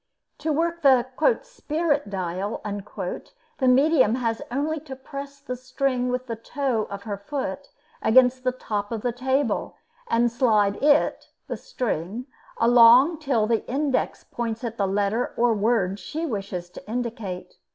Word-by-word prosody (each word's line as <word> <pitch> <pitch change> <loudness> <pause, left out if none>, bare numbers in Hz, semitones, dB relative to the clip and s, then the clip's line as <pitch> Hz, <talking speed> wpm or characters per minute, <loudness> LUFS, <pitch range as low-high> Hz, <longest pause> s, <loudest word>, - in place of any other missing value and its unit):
To 315 +1 -1
work 335 +3 0
the 260 -4 +5 0.4
"spirit 320 - -1
dial," 190 +2 -3
the 210 - -5
medium 260 -3 +5
has 230 -3 -1
only 295 +5 -1
to 280 -3 -9
press 280 +1 -8
the 275 -3 -5
string 255 0 -1
with 250 0 -2
the 230 -2 -4
toe 240 -1 -1
of 200 0 -7
her 205 -3 -4
foot 200 -4 -4 0.3
against 255 +2 +4
the 255 - +2
top 210 -4 -4
of 225 -2 -3
the 245 - +1
table, 260 -1 -1 0.3
and 235 - +2
slide 215 -5 +2
it 290 +1 +3 0.2
(the - - -4
string) 235 - -3 0.3
along 245 +7 +6
till 265 -8 +1
the 225 0 +1
index 275 +1 0
points 230 0 -4
at 230 -1 -4
the 200 - +1
letter 205 +4 0
or 240 0 +4
word 205 -3 +1
she 320 +8 -4
wishes 195 - -4
to - - -12
indicate. 225 -6 -4
245 Hz, 150 wpm, -25 LUFS, 215-275 Hz, 0.4 s, along